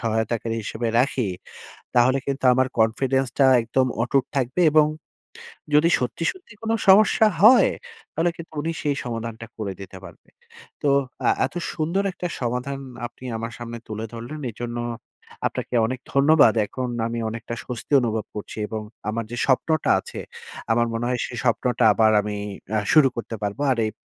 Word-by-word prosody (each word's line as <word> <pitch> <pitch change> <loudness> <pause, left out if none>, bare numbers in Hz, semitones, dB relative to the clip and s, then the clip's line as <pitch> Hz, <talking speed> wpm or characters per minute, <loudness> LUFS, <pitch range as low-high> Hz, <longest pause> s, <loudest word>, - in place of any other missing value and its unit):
সহায়তাকারী 115 0 -1
হিসেবে 115 +3 -3
রাখি। 125 -3 +1 0.7
তাহলে 125 +2 +5
কিন্তু 135 -1 -3
আমার 130 +1 +2
confidence 130 +4 +1
টা 135 - +7 0.2
একদম 130 +3 +1 0.2
অটুট 130 +1 +1
থাকবে 135 +6 0
এবং 155 0 +6 0.9
যদি 150 +3 +5
সত্যি, 125 +6 -3
সত্যি 370 - -17
কোনো 225 0 0
সমস্যা 210 +3 +6 0.2
হয়, 245 +5 +8 0.4
তাহলে 170 +2 +1
কিন্তু 170 -1 -10
উনি 165 +2 -2
সেই 145 -1 0
সমাধানটা 115 -1 -5
করে 105 -3 -4
দিতে 95 -1 -9
পারবে। 85 -3 -14 0.5
তো 145 - +1 0.4
আ - - +5 0.2
এত - - -11 0.2
সুন্দর 170 +4 0
একটা 175 - -5
সমাধান 125 +3 -2 0.3
আপনি 125 +1 -14
আমার 115 +1 -5
সামনে 120 0 -6
তুলে 110 +1 -4
ধরলেন, 120 +7 -7
এজন্য 120 +2 -5 0.7
আপনাকে - - -6
অনেক 130 +1 -4
ধন্যবাদ। 140 -3 +5
এখন 130 +4 -4 0.2
আমি 115 0 -3
অনেকটা 115 +1 -6
স্বস্তি 125 +2 -7
অনুভব 110 -3 -1
করছি 105 - -7
এবং 110 -1 -4 0.3
আমার 115 +1 -3
যে 120 - -4
স্বপ্নটা 155 +4 +2
আছে, - - -8 0.5
আমার 120 +1 +2
মনে 115 +1 -2
হয় 125 -1 -1
সে 120 - -9
স্বপ্নটা 120 0 +1
আবার 110 0 +4
আমি 105 0 -4 0.4
আ - - +3
শুরু 150 -4 +7
করতে 115 -1 -5
পারবো। 105 +6 -3
আর 120 - -3
এব - - -8
125 Hz, 160 wpm, -23 LUFS, 115-140 Hz, 0.9 s, হয়